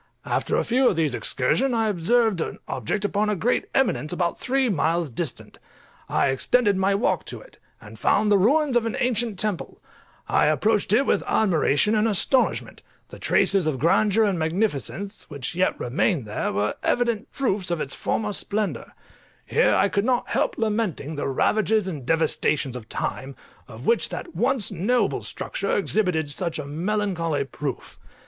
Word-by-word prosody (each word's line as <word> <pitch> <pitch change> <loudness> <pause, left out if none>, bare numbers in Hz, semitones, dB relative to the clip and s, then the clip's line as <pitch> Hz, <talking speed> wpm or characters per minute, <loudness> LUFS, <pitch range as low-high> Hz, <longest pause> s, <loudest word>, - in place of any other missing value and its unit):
After - - -1
a - - +1
few 255 +2 +2
of - - -1
these 155 -5 +1
excursions 240 - 0
I 225 -1 +1
observed 210 +1 +2
an - - -4
object 160 - -2
upon 210 +1 0
a 210 - +1
great 235 +6 0
eminence 225 - +1
about 175 -1 -1
three 265 0 +1
miles 165 - 0
distant: 150 +3 -5 0.5
I - - +2
extended 205 - +2
my 195 +1 +1
walk 205 - 0
to - - -8
it, - - -17 0.2
and - - -13
found 210 0 +2
the 205 - +6
ruins 275 +6 +3
of 235 -1 +2
an 225 - -3
ancient 235 -4 0
temple: 205 -2 -2 0.5
I - - +3
approached 210 +7 +1
it 250 +6 +4
with - - +2
admiration 190 -2 +2
and 215 +1 +2
astonishment; 225 +5 0 0.3
the - - -11
traces 195 -5 +3
of 150 -4 0
grandeur 205 - +3
and 195 -5 +1
magnificence 190 +3 -2
which 140 -2 -5
yet 185 +2 0
remained 135 - 0
were 105 0 -1
evident 235 -3 0
proofs 205 -9 -1
of 170 -2 -1
its 140 - -3
former 210 -2 -2
splendour: 210 +1 -3 0.5
here 475 - +2
I - - +3
could 200 0 0
not 250 +1 0
help - - 0
lamenting 210 -9 -1
the 145 - -3
ravages 215 +9 +1
and 145 -9 -6
devastations 155 -4 +1
of 120 -2 -9
time, 135 +1 -4 0.3
of - - -11
which 470 - +2
that 345 - -7
once 245 -5 +1
noble 205 +4 0
structure 200 - -3
exhibited 180 -6 0
such 170 +3 -3
a 150 - -5
melancholy 165 -1 -1
proof. 135 -1 -6
200 Hz, 165 wpm, -24 LUFS, 160-220 Hz, 0.5 s, the